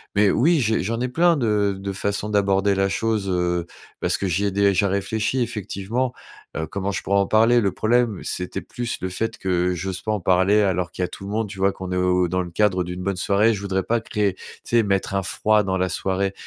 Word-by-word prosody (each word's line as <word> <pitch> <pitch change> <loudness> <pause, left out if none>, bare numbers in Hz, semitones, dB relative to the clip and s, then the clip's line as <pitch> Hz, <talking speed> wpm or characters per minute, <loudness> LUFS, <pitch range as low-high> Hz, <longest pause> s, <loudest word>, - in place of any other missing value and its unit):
mais 100 0 +4
oui, 160 +6 +3
j'ai 110 -5 +1
j'en 115 +4 -2
ai 125 - 0
plein 170 +5 +3
de 105 -5 +1
de 100 0 -4
façon 100 +2 -2
d'aborder 100 -1 +2
la 95 0 +1
chose, 110 -1 -1
heu, 90 -1 0 0.4
parce - - +1
que 100 - -2
j'y 95 +3 0
ai 100 - 0
déjà 100 0 +2
réfléchi 105 +6 -1
effectivement. 115 +3 -2 0.4
Heu, 80 - -2
comment 100 +5 -3
je - - -4
pourrais 100 +1 +2
en 100 - +1
parler? 115 +2 +4
Le 100 -3 +1
problème, 115 -2 +1
c'était 90 0 -4
plus 120 -1 -5
le 95 - -2
fait 110 +5 -3
que 90 -1 0
j'ose 95 +1 -4
pas 110 - -2
en 105 - 0
parler 95 +3 +3
alors 90 -3 0
qu'il 90 - -3
y - - +2
a - - -4
tout - - -11
le - - -6
monde, 110 +1 -1
tu 95 -1 -10
vois? 95 +1 +3
Qu'on 95 -1 -7
est - - -1
au 90 0 +2
dans 90 +2 -1
le 90 - -5
cadre 95 0 +1
d'une 90 +1 -6
bonne 100 +1 -1
soirée, 100 +5 +3
je 100 - -5
voudrais 95 -1 -1
pas 115 +3 0
créer 105 -3 -1
tu - - -18 0.2
sais, 120 -1 +2
mettre 100 -1 -1
un 100 - +1
froid 105 +3 +2
dans 95 -1 -1
la 95 0 0
soirée. 95 +1 -1
100 Hz, 245 wpm, -22 LUFS, 95-110 Hz, 0.4 s, mais